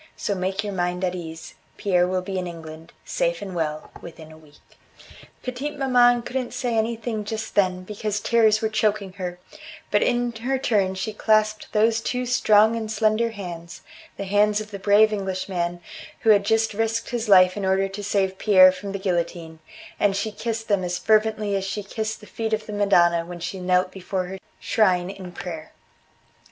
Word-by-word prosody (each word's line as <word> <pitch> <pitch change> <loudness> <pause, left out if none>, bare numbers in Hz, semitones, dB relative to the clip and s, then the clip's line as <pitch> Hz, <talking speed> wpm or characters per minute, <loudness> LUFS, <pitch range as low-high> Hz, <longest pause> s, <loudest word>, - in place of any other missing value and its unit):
So 205 - -1
make 190 +2 -2
your 205 -1 -4
mind 180 0 -2
at 180 -1 0
ease, 165 -2 -8 0.2
Pierre 180 -3 +2
will 185 0 -1
be 190 0 -3
in 180 - -4
England, 165 -1 -10
safe 170 0 -1
and 195 -2 -7
well, 155 -3 -3
within 160 -2 -11
a - - -13
week." 150 -1 -23 0.6
Petite 265 +4 -4
maman 245 -3 +4
couldn't 250 0 -4
say 245 -1 -2
anything 225 0 -1
just 220 +1 -5
then 185 -2 +1
because 210 +1 -3
tears 220 0 +3
were - - +3
choking 215 -3 0
her, 180 -1 -4 0.5
but 205 - +3
in 240 0 +1
her 260 +4 -1
turn 205 -7 +1
she 190 +3 -3
clasped 215 0 +1
those 225 +1 +2
two 250 +2 -2
strong 220 -3 +4
and 220 -1 -4
slender 220 +1 +2
hands 175 -5 -8 0.3
the - - -4
hands 205 +2 +2
of 215 0 -8
the 200 - -6
brave 210 +2 +4
Englishman 185 -3 -3 0.4
who 225 - +5
had 200 -1 +4
just 225 +1 +2
risked 225 +3 -1
his 235 -2 -2
life 185 -2 +6
in 205 - -4
order 190 +1 +2
to 195 +1 -7
save 195 -1 0
Pierre 185 -3 +7
from 195 +2 -7
the - - -2
guillotine 170 -3 -3 0.4
and 200 -1 +2
she 210 +2 -2
kissed 225 +1 -4
them 200 -3 +1
as 175 0 -2
fervently 215 0 +2
as 195 - -1
she 195 +2 -4
kissed 220 +2 -4
the - - -12
feet 220 +1 -4
of 215 0 -1
the 210 - -7
Madonna 175 -5 +3
when 175 +1 -8
she 175 +3 -5
knelt 180 0 +1
before 185 0 -3
her 190 +1 -7 0.2
shrine 185 -4 +1
in 190 -2 -9
prayer. 165 -3 -7
200 Hz, 190 wpm, -23 LUFS, 185-220 Hz, 0.6 s, Pierre